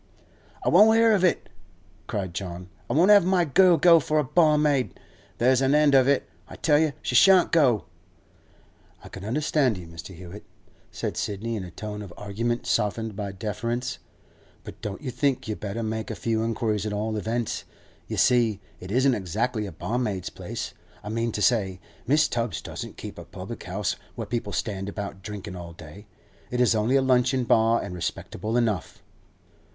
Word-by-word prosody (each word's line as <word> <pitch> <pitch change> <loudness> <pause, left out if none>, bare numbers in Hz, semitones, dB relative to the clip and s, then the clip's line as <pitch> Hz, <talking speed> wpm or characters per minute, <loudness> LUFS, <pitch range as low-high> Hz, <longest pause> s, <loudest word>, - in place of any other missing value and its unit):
'I - - +3
won't 215 +5 +6
hear 230 0 +5
of 195 -3 +2
it:' 180 - +2 0.6
cried 95 -4 -3
John. 90 -1 -6 0.2
'I - - 0
won't 180 +7 +5
have 205 -3 +8
my 180 -1 +2
girl 175 +3 +5
go 170 +2 +7
for 155 +1 -1
a 150 - +3
barmaid, 150 -3 +2
so - - -22 0.4
there's 130 +2 +3
an 135 +2 +3
end 150 -1 +4
of 135 -1 +5
it. 140 0 +2 0.2
I - - -10
tell 150 -3 +3
you 155 -2 +1
she - - -2
shan't 190 -2 +6
go!' 135 -10 +3 1.2
'I - - -11
can 95 - -9
understand 135 0 +1
you, 90 - -9
Mr. 85 +3 -10
Hewett,' 90 +4 -11 0.4
said - - -4
Sidney, 110 +3 -3
in 100 - -4
a 90 - -8
tone 105 +4 -7
of 100 -4 -9
argument 115 +4 -2
softened 110 +1 -1
by 100 -1 -4
deference; 115 +5 -3 0.6
'but - - -11
don't 105 +4 -6
you 130 - -3
think 125 0 0
you'd 110 - -4
better 105 +3 -4
make 110 0 -3
a - - -4
few 110 -1 -1
inquiries, 110 -2 -1
at 105 - -3
all 110 +1 -2
events? 115 +2 -2 0.4
You - - -4
see, 115 -5 +3 0.2
it 90 - -9
isn't 130 +3 +3
exactly 105 +3 -2
a - - -7
barmaid's 105 +2 -3
place. - - -6 0.3
I 105 - -6
mean 115 +1 -1
to 105 - -1
say, 95 -4 +2 0.3
Mrs. 150 +2 +3
Tubbs 115 -7 -2
doesn't - - -7
keep - - -8
a - - -8
public - - -9
house - - -2 0.2
where - - -4
people 115 -4 -3
stand 100 -2 -3
about 100 -1 -6
drinking 100 -1 -7
all 85 -1 -8
day. 85 +5 -12 0.4
It 125 - -2
is 125 -2 +4
only 110 +4 +1
a 135 - +4
luncheon 130 0 +2
bar, 115 0 +3
and - - -6
respectable 110 +6 -3
enough. 110 -7 -1
115 Hz, 185 wpm, -25 LUFS, 100-135 Hz, 1.2 s, have